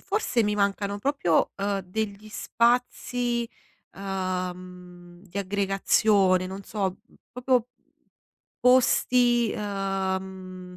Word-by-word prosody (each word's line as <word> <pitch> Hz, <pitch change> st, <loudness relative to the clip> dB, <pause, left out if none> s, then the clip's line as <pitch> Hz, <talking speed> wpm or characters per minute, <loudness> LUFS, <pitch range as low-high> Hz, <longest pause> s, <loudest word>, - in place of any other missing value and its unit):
forse 390 Hz, -, 0 dB
mi 210 Hz, 0 st, 0 dB
mancano 200 Hz, 0 st, 0 dB
proprio, 220 Hz, -, +1 dB
uhm, 200 Hz, 0 st, -1 dB
degli 205 Hz, +2 st, -5 dB
spazi, 240 Hz, +1 st, 0 dB, 0.5 s
uhm, 180 Hz, -2 st, -5 dB
di 195 Hz, -1 st, -7 dB
aggregazione, 195 Hz, -1 st, +2 dB
non 190 Hz, +2 st, -7 dB
so, 195 Hz, -2 st, -2 dB, 0.4 s
proprio 250 Hz, +1 st, +2 dB, 1.1 s
posti, 245 Hz, -2 st, +4 dB
uhm, 195 Hz, -2 st, -2 dB
mhmm, 185 Hz, -1 st, -10 dB
200 Hz, 90 wpm, -26 LUFS, 185-230 Hz, 1.1 s, posti